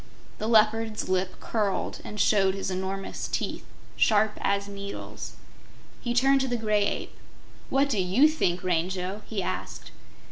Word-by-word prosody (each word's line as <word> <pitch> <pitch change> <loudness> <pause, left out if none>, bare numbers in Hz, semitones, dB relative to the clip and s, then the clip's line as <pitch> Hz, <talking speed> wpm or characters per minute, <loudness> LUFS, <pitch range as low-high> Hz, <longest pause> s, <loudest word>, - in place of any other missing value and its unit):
The 215 - -2
Leopard's 220 -1 +3
lip 185 0 0
curled 210 -4 -1
and 210 - -7
showed 195 -3 +4
his 195 -1 -3
enormous 190 +1 -3
teeth, - - -3 0.3
sharp 215 0 +4
as 200 0 +1
needles. 200 0 -7 0.7
He 240 -1 -2
turned 270 +2 +4
to 265 - 0
the 245 -1 0
Gray 210 -2 +2
Ape. - - -4 0.5
"What 275 +1 +3
do 215 - 0
YOU 195 +12 +5
think, 185 - 0
Rango?" 185 +3 -1
he 205 -4 -2
asked. - - -5
205 Hz, 145 wpm, -27 LUFS, 190-225 Hz, 0.7 s, YOU